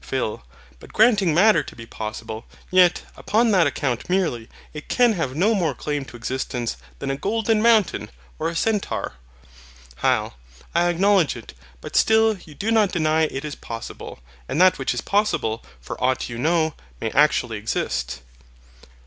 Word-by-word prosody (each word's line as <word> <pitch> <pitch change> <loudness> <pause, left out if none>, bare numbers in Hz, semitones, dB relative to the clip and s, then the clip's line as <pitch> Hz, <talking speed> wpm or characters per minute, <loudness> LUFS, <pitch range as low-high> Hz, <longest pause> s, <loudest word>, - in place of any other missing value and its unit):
PHIL. - - -3 0.4
But - - -15
granting 210 -6 +4
Matter 180 +1 +5
to - - -11
be 115 - -10
possible, 110 0 -6 0.3
yet, 180 -1 +4
upon 225 +1 +1
that 180 -6 +4
account 130 -2 -2
merely, 165 -12 0 0.2
it 150 -1 -8
can 245 -2 +4
have 160 -9 -3
no 200 +8 +3
more 170 - 0
claim 145 +2 -3
to 125 - -12
existence 120 - -3 0.2
than 135 - -3
a - - -1
golden 220 +6 0
mountain, 225 -4 +3 0.3
or - - 0
a 170 - -6
centaur. 210 +3 -1 0.8
HYL. - - +1 0.4
I 175 +1 +3
acknowledge 185 -2 +3
it; 115 - -10 0.3
but - - -8
still 220 0 +4
you 165 -5 -14
do 220 +8 -2
not 215 -4 +3
deny 160 -1 +2
it 140 -1 -5
is 150 - -4
possible; 115 -3 -8 0.3
and 150 - -1
that 185 0 +5
which - - -1
is - - -2
possible, 200 - 0 0.2
for - - -7
aught 130 0 +1
you 120 0 -6
know, 160 +2 +1 0.3
may - - -2
actually - - +2
exist. 65 0 -3
165 Hz, 165 wpm, -23 LUFS, 130-205 Hz, 0.8 s, Matter